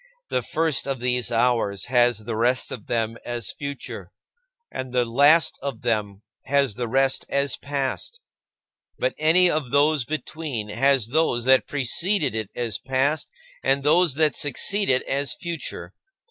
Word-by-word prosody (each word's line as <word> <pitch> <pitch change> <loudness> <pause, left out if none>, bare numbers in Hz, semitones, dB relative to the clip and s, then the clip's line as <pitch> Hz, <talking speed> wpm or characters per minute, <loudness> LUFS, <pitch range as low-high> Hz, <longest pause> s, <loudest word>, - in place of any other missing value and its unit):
The - - +1
first 160 -4 0
of 135 -2 -2
these 125 -2 0
hours 115 -4 +1
has 120 -3 +2
the 115 0 -4
rest 120 +3 +1
of 110 - -8
them 115 -1 -1
as 120 -1 -3
future, 140 -1 -7 0.6
and 130 -1 -6
the 125 -1 +1
last 145 +6 +4
of 135 -5 -5
them 105 -4 -2 0.2
has 140 -4 +2
the 120 +2 -4
rest 135 +2 +1
as 140 -1 0
past; 140 - -4 0.8
but - - 0
any 180 +4 +5
of 155 -6 -1
those 145 +1 +3
between 140 -4 -5
has 130 +1 +1
those 130 -5 +1
that 130 0 +4
preceded 145 - 0
it 110 -3 -3
as 115 -4 -2
past 135 +4 -1 0.3
and 135 0 +1
those 160 0 +3
that 155 -1 +2
succeed 200 +7 +1
it 130 -1 +3
as 140 -1 -1
future. 170 -3 -6
135 Hz, 150 wpm, -23 LUFS, 120-150 Hz, 0.8 s, any